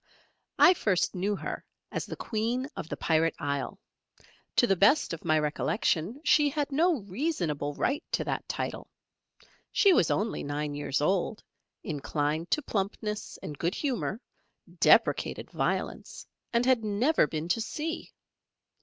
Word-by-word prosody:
I 365 - +8
first 195 - +1
knew 195 +3 0
her - - -5 0.3
as - - -3
the - - -5
Queen 235 +4 -2
of 160 - -6
the - - -4
Pirate 165 0 +2
Isle. 140 +3 -3 0.8
To - - +5
the 195 - +3
best 205 - +4
of 165 - -7
my 155 -2 +3
recollection 165 - 0
she 295 -1 +5
had 290 0 -2
no 320 -1 +2
reasonable 180 - -2
right 280 +3 0
to - - +1
that - - -3
title. - - -4 0.8
She 395 -2 +5
was 175 - +3
only 215 +3 0
nine 145 +1 -3
years 145 -1 -1
old, 190 +6 0 0.4
inclined 150 0 -2
to 300 - +1
plumpness 210 0 -3
and 145 -2 -7
good 170 +4 0
humour, 250 -6 -2 0.6
deprecated - - +3
violence - - -2 0.3
and 235 0 +2
had 255 -3 +3
never 215 - +2
been 155 +1 -4
to 225 - +1
sea. 320 +8 -4
200 Hz, 145 wpm, -29 LUFS, 155-255 Hz, 0.8 s, I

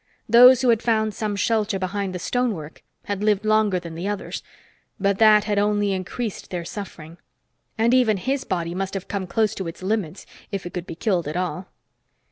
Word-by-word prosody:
Those 250 +3 +8
who 250 - +4
had 230 -2 +3
found 220 -2 +1
some 210 -2 -3
shelter 210 0 0
behind 190 0 -3
the - - -1
stonework 190 -7 -2 0.2
had 205 0 -3
lived 210 -1 +2
longer 215 -3 +3
than 170 -2 -9
the 170 +4 -4
others, 205 -1 -4 0.6
but 200 0 +1
that 215 -1 +6
had 210 -1 0
only 205 0 +1
increased 195 +4 -4
their 175 -2 -4
suffering. 170 -6 -8 0.6
And 230 +2 +3
even 240 -5 +4
his 265 +7 -1
body 170 -2 -2
must 195 +1 -3
have 195 - -5
been 195 -2 -3
close 215 +2 +1
to 190 - -5
its 165 +2 -8
limits, 195 -3 -2 0.3
if 195 -3 -4
it 175 - -7
could 180 -1 -5
be 165 - -6
killed 175 -3 0
at 155 +3 -3
all. 180 0 -3
200 Hz, 195 wpm, -23 LUFS, 185-220 Hz, 0.6 s, Those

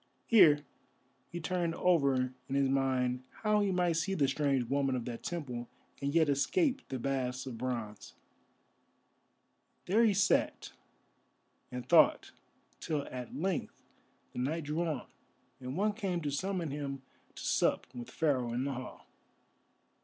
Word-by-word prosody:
Here 155 -10 +6 0.6
he 175 - -5
turned 170 0 -1
over 140 -7 +2 0.2
in 135 - -1
his 140 -1 +3
mind 130 -2 +1 0.2
how 210 -1 +3
he 200 - +1
might 175 -2 +1
see 195 +4 0
the 140 -6 +2
strange 135 -2 +1
woman 135 0 +1
of 120 -2 -3
the 120 - -4
temple, 125 -8 -5 0.3
and 140 0 0
yet 160 0 +4
escape 265 - +1
the 130 - -4
baths 130 0 -2
of 120 -4 -7
bronze. 115 -4 -4 1.7
There 215 +6 +3
he 215 -4 +4
sat 195 0 +1 1.0
and 125 -1 -6
thought - - +5 0.5
till 150 -3 -2
at 125 -1 -6
length 185 +2 -3 0.5
the - - -5
night 155 +6 -1
drew 150 +3 -2
on, 150 -6 -3 0.5
and 130 +4 -5
one 210 +2 +2
came 195 -5 -2
to 145 -2 -2
summon 175 +1 -2
him 140 -2 -4 0.3
to - - -8
sup - - +1
with 120 -1 -7
Pharaoh 130 -7 0
in 125 +2 -1
the 140 0 -2
Hall. 130 0 -8
140 Hz, 145 wpm, -32 LUFS, 130-175 Hz, 1.7 s, Here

